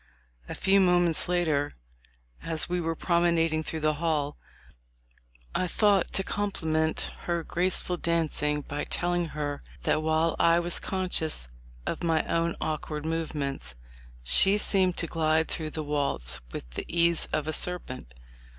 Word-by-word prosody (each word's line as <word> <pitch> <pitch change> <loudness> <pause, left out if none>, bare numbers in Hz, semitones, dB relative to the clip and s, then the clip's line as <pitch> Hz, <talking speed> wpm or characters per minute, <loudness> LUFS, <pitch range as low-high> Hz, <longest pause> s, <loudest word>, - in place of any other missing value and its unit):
A - - -4
few 195 +1 +4
moments 175 -3 +3
later, 155 -5 +1 0.7
as 160 -1 0
we 180 0 -1
were 165 0 -1
promenading 170 -2 +2
through 160 0 -4
the 155 0 +2
hall, 150 -3 0 1.2
I 185 - 0
thought 200 0 +3
to 195 - +1
com 205 +1 -1
pliment 160 -2 0 0.2
her 170 -1 0
graceful 180 +1 0
dancing 155 -3 0
by 145 +1 -4
telling 175 -1 0
her 145 -1 -2 0.2
that 155 - +2
while 160 +1 +2
I 170 0 +5
was 175 0 0
conscious 180 - -2 0.4
of - - -3
my 165 -2 +2
own 170 0 0
awkward 155 -1 -3
move 165 -1 -2
ments, 135 - -3 0.5
she 195 - +5
seemed 190 -3 +2
to - - -1
glide 160 -1 +1
through 155 -2 -2
the 155 0 -4
waltz 140 - -1
with - - -6
the - - -4
ease 170 -1 +3
of 155 0 -1
a 155 - -1
serpent. 140 - -3
165 Hz, 150 wpm, -28 LUFS, 155-175 Hz, 1.2 s, I